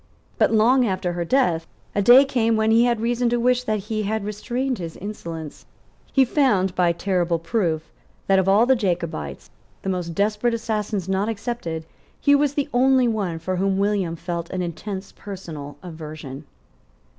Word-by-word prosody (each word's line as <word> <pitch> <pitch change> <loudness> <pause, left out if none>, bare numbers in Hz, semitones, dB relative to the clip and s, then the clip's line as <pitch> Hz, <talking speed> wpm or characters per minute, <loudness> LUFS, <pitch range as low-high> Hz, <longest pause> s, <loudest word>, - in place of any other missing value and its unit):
But, - - +4
long 240 +3 +4
after 185 -2 -1
her 175 0 -2
death, 170 -6 +1 0.3
a 205 - +1
day 245 +7 +8
came 230 -4 +1
when 220 0 +2
he 230 +2 +5
had 240 -2 +1
reason 240 +1 +1
to 240 0 +1
wish 250 +1 +3
that 215 -2 0
he 215 +2 -3
had 215 0 -2
restrained 245 +4 -2
his 165 -2 -6
insolence. 165 -7 -7 0.4
He 270 -1 +4
found, 210 -10 +2
by 180 -2 +3
terrible 175 -1 0
proof, 165 -2 -1 0.3
that 195 -1 +4
of 190 0 +1
all 205 +4 +5
the 265 +1 +4
Jacobites, 170 - -3 0.3
the 195 - -2
most 175 -3 -3
desperate 215 +4 +1
assassins 210 -4 -2
not 195 +3 0
excepted, 210 -8 -4 0.3
he 285 - +4
was 285 0 +3
the 285 0 0
only 260 0 +4
one 200 -7 -1
for 185 +3 -3
whom 195 +1 +1
William 200 -4 0
felt 170 0 -5
an 185 -1 -2
intense 190 +3 -5
personal 155 -8 -8
aversion. 155 -4 -8
200 Hz, 170 wpm, -23 LUFS, 170-235 Hz, 0.4 s, day